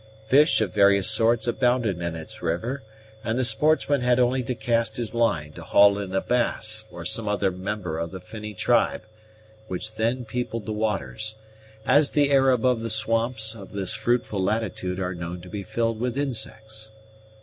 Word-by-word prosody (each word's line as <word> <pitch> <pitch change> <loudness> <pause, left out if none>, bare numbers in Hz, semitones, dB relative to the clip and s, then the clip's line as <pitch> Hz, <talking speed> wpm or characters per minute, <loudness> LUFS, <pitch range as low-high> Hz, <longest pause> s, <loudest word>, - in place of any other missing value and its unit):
Fish 145 +3 +5
of 110 - -1
various 100 -1 +4
sorts 110 +1 +3
abounded 120 -6 +1
in 85 -1 -3
its 80 -1 -9
river, 90 +12 -2 0.4
and 110 +1 -1
the 130 - +1
sportsman 145 0 +3
had 125 0 +2
only 125 +1 +2
to 125 +1 -3
cast 115 -2 0
his 120 -1 0
line 85 -11 0
to - - -10
haul 100 0 +4
in 100 -2 -5
a 95 - +2
bass 110 -3 0
or 85 -1 -9
some 115 +4 +1
other 100 -2 +1
member 90 -3 -4
of 85 0 -3
the 95 - -8
finny 105 +3 -9
tribe, - - +1 0.6
which 110 +4 -5
then 115 +3 -1
peopled 115 -1 -4
the 110 - -3
waters, 110 0 -2 0.5
as 140 +3 +4
the 145 -1 +2
air 135 -1 +5
above 125 -1 +2
the 115 - -3
swamps 110 +1 +2
of 100 -4 -12
this 100 -2 +1
fruitful 120 -5 0
latitude 95 -3 -2
are 90 -1 -2
known 85 0 -6
to 90 +1 -12
be 100 +2 -5
filled 115 +3 -2
with 125 +1 -2
insects. 110 -5 -3
110 Hz, 180 wpm, -24 LUFS, 100-120 Hz, 0.6 s, Fish